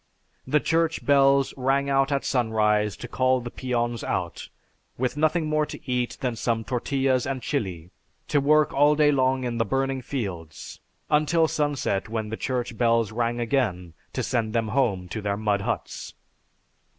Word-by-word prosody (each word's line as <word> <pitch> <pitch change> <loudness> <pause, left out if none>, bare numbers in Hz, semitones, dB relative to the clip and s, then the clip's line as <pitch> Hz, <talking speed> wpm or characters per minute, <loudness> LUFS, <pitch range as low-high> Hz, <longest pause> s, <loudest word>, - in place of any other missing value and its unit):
"The 150 +3 +3
Church 165 +1 0
bells 140 -1 +4
rang 135 +1 +1
out 135 0 +2
at 140 -1 0
sunrise 105 -4 +1
to 120 - -7
call 130 +1 +2
the 120 -1 -7
peons 120 -2 -2
out, - - -3 0.5
with 125 +2 -1
nothing 155 +2 +1
more 155 0 +1
to - - -8
eat 125 -1 -1
than 125 -3 -1
some 115 0 -1
tortillas 130 +1 0
and 135 -1 -2
chili, 95 - -3 0.4
to 145 -2 +2
work 150 +1 +3
all 145 +2 +4
day 150 -1 +4
long 130 -1 +1
in 120 -1 -2
the - - +4
burning 135 +3 -1
fields, 95 - -6 0.3
until 155 +2 +3
sunset 145 -11 -1
when 110 -1 -3
the 110 - -3
Church 125 -1 -3
bells 115 -2 +2
rang 120 +1 -1
again 110 - -1 0.2
to - - -2
send 115 -3 -1
them 115 -2 0
home 105 -7 0
to 110 - -4
their 100 0 -1
mud 105 -2 0
huts. - - -4
125 Hz, 165 wpm, -25 LUFS, 110-140 Hz, 0.5 s, bells